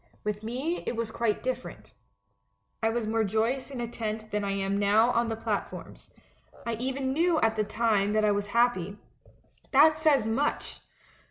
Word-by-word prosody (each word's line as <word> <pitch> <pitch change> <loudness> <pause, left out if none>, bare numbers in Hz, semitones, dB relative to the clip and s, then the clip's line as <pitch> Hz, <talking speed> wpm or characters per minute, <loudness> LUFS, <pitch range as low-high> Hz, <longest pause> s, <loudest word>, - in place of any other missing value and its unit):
With 210 0 -2
me 260 +10 -3
it - - -1
was 230 -1 -3
quite 230 -2 -1
different. - - -5 0.9
I 225 - +2
was 230 0 -1
more 225 +1 +1
joy 220 +4 +1
ous 265 - -11
in 270 -3 -6
a 240 - -2
tent 220 -1 -5
than 210 0 -1
I 200 0 -1
am 195 0 -1
now 215 +4 +4
on 235 -1 +1
the 225 - -1
platforms. 225 - -5 0.6
I 235 - -1
even 265 +2 -2
knew 330 +2 +2
at 225 0 +2
the 215 - +1
time 210 -1 +1
that 215 0 +3
I 210 - +4
was 205 0 -1
happy. 205 -4 +1 0.8
That 310 +3 +6
says 295 -7 +3
much 245 +7 -1
225 Hz, 180 wpm, -28 LUFS, 210-250 Hz, 0.9 s, That